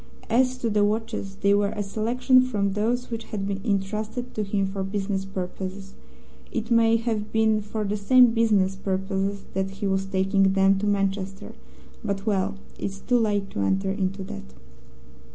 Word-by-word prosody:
As 255 +2 +3
to 235 -2 -1
the 205 0 +3
watches, 215 -2 -2
they 200 +1 +4
were 205 0 +2
a 205 - -1
selection 240 +5 +3
from 210 -6 0
those 240 +4 -1
which 225 -1 -4
had 195 -2 -4
been 200 -1 -3
intrusted 215 +4 -2
to 215 - -2
him 200 -1 0
for 195 0 -4
business 195 0 -2
purposes. 190 +1 -6 0.6
It 230 0 -3
may 230 -1 +5
have 220 -2 -2
been 220 -1 +3
for 210 +1 -4
the 210 +1 -1
same 245 +4 +6
business 210 -5 +2
purposes 195 +1 -2
that 190 0 -1
he 195 +2 -6
was 195 0 0
taking 195 0 +2
them 195 0 +4
to 210 - -1
Manchester, 195 -1 -1 0.5
but 200 -2 -3
well, 200 -1 0 0.2
it's 195 0 -4
too 245 +3 +2
late 205 -3 0
to - - -4
enter 190 - +1
into 195 0 -2
that. 65 - -9
200 Hz, 170 wpm, -25 LUFS, 195-220 Hz, 0.6 s, same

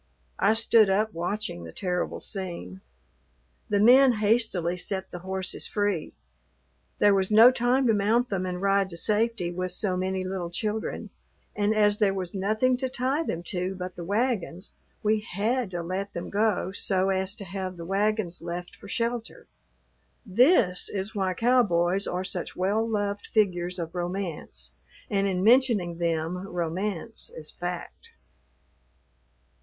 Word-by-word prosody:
I 215 +3 +4
stood 225 -2 +5
up 210 +3 +1
watching 175 - -3
the 80 - -9
terrible 180 - -2
scene. 170 - -5 0.9
The 205 - +2
men 250 +4 +7
hastily 210 -5 +1
set 190 +1 -3
the 175 - -6
horses 190 +1 -3
free. 205 -6 -1 0.8
There 205 - +5
was 190 -1 +1
no 225 +3 +8
time 255 +2 +2
to 230 - +4
mount 220 +4 +2
them 185 -1 -1
and 180 0 -3
ride 195 0 +2
to 170 - -6
safety 215 -2 +1
with 185 +1 -3
so 195 -4 -1
many 185 0 -1
little 185 -2 -4
children, 215 +4 -3 0.4
and 210 +1 +1
as 210 -1 +3
there 200 -3 +2
was 185 -2 -3
nothing 215 +6 +1
to 260 0 -2
tie 260 +4 0
them 175 - -3
to 185 +1 -2
but 180 -1 -6
the 175 - -7
wagons; 205 -2 -2 0.3
we 215 +1 +2
had 220 +3 -1
to 175 -2 -4
let 190 +3 -4
them 170 - -6
go 205 -3 +1
so 190 -1 0
as 190 +1 0
to 200 - -8
have 185 0 -5
the 170 - -7
wagons 195 -1 0
left 175 +1 -6
for - - -13
shelter. 230 +2 -3 0.8
This 215 - +3
is 195 +1 -4
why 190 -3 -1
cowboys 195 -6 +2
are 180 +1 -2
such 180 -2 -4
well 205 +5 0
loved 205 -1 -2
figures 180 -4 +1
of 165 -1 -5
romance 175 -1 -4 0.4
and 200 -1 +2
in 185 -1 -1
mentioning 220 -8 +3
them 165 +1 -1
romance 180 +4 -3
is 155 -1 -8
fact. 175 0 -6
195 Hz, 150 wpm, -26 LUFS, 180-215 Hz, 0.9 s, no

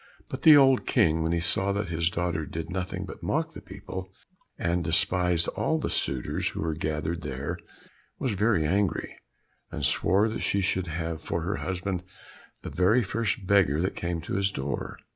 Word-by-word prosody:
But 130 - -5
the 155 -2 +9
old 135 -2 +5
King, 80 0 +3
when 80 +1 0
he 85 - +1
saw 95 +4 +1
that 100 -2 -2
his 85 0 +1
daugher 85 -3 -2
did 80 +3 -5
nothing 95 0 -3
but - - -10
mock - - -1
the - - -9
people, 95 0 -8 0.5
and 85 +1 0
despised 85 +1 +2
all 160 - 0
the 155 - -2
suitors 65 -2 -1
who - - -5
were 80 -1 -1
gathered 80 +2 -2
there, 75 +4 -4 0.6
was 130 - -1
very 100 -5 +2
angry, 95 +2 0 0.5
and 75 -4 -3
swore 95 +9 +3
that 110 - -4
she 100 - +1
should 95 -1 0
have 80 0 -3
for 85 - -2
her 95 +5 -2
husband 95 0 -3 0.6
the - - -6
very 100 +8 +3
first 110 +1 -2
beggar 95 -7 +3
that 95 +3 -1
came 85 -1 -3
to 85 - -6
his 100 0 +2
doors. 70 -5 -4
90 Hz, 180 wpm, -27 LUFS, 80-100 Hz, 0.6 s, the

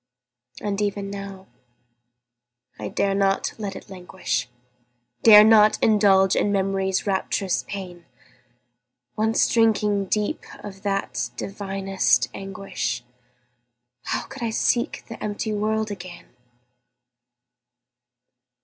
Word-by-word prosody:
And 205 0 -2
even 200 -1 -2
now, 195 -1 -8 1.3
I 105 - -4
dare 195 - 0
not 195 0 +1
let 200 -3 -4
it - - -10
languish, 180 -10 -4 0.7
Dare 210 -2 +9
not 215 -1 +6
indulge 195 -3 +4
in 205 - +1
Memory's 195 -1 0
rapturous 195 -1 -1
pain; 180 -4 -7 1.1
Once 220 +1 +2
drinking 210 -3 +2
deep 210 +2 -1 0.2
of 195 -1 -9
that 125 -12 -2
divinest 195 0 0
anguish, 195 -8 -4 1.0
How - - -2
could 270 - -11
I 235 - -1
seek 235 +2 0
the 230 - -8
empty 215 +1 -3
world 215 +1 -1
again? 185 -8 -10
195 Hz, 100 wpm, -23 LUFS, 190-210 Hz, 1.3 s, Dare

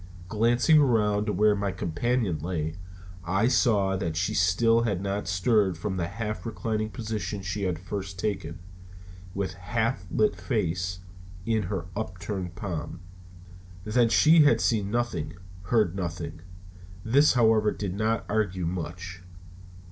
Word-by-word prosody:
Glancing 120 - +4
around 105 -6 +2
to - - +1
where 105 +2 +3
my 100 -1 -1
companion 90 +1 -1
lay, 80 -1 -3 0.5
I 95 +6 +1
saw 105 -7 +3
that 85 -4 -2
she 95 +5 0
still 110 +5 +3
had 105 -6 0
not 100 0 -3
stirred 95 0 +2
from 95 +2 -3
the 85 -2 -1
half 105 -1 -4
reclining 110 -1 -2
position 105 -4 -4
she 95 +2 -2
had 90 -3 -1
first 95 +1 -6
taken, 95 -4 -3 0.8
with 95 -2 -2
half 110 +2 -2
lifted 210 - +1
face 90 - -1 0.4
in 110 -1 +1
her 95 -5 -3
upturned 90 -3 -4
palm. 85 -2 -5 0.8
Then 115 +3 +2
she 160 +6 +6
had 150 0 +5
seen 105 -5 +1
nothing, 120 -8 -2 0.3
heard 105 -3 +2
nothing. 85 -3 -5 0.6
This, 140 +7 +5
however, 110 -3 +4
did 100 -3 -4
not 110 +3 0
argue 100 -4 -1
much. 90 +1 -5
100 Hz, 135 wpm, -27 LUFS, 90-110 Hz, 0.8 s, she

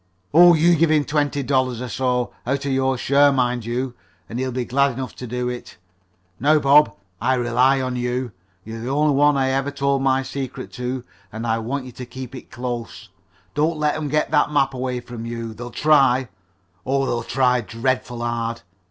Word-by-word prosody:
"Oh, 175 +2 +8
you 170 +2 +4
give 165 0 +3
him 150 -2 +3
twenty 145 -1 0
five - - -10
dollars 130 -3 +1
or 125 - -4
so 125 -1 -1
out 140 +2 -1
of 140 - -1
your 130 0 +1
share, 140 +3 +4
mind 125 -3 0
you 120 +2 -2 0.3
and 115 - -5
he'll 130 0 -1
be 125 0 -2
glad 140 +2 +2
enough 130 +1 -5
to 125 - -7
do 125 +1 -2
it. 125 0 -6 0.6
Now, 150 +5 +4
Bob, 145 -5 +5 0.3
I 130 - +2
rely 125 +2 +2
on 130 -1 -2
you. 125 0 -2 0.3
You're 115 +2 -7
the 120 - -4
only 150 +2 +2
one 145 +1 +4
I 135 -1 +1
ever 135 +1 0
told 140 -1 0
my 135 0 +2
secret 135 -1 -6
to, 125 0 -4 0.3
and 110 +2 -5
I 115 0 +1
want 130 +4 -3
you 125 - -9
to 125 +1 -8
keep 130 0 -8
it 130 - -10
close. 120 -2 -6 0.4
Don't 155 +2 +1
let 150 0 +1
'em 155 -1 -3
get 150 +2 0
that 150 -1 +3
map 135 -2 +2
away 125 -1 -3
from 120 -1 -8
you. 115 -1 -5
They'll 120 +2 -8
try 135 -3 +3 0.5
oh, 135 +3 0
they'll 120 -2 -1
try 125 0 +1
dreadful 120 +1 -2
hard. 115 -1 -3
130 Hz, 200 wpm, -22 LUFS, 120-140 Hz, 0.6 s, Oh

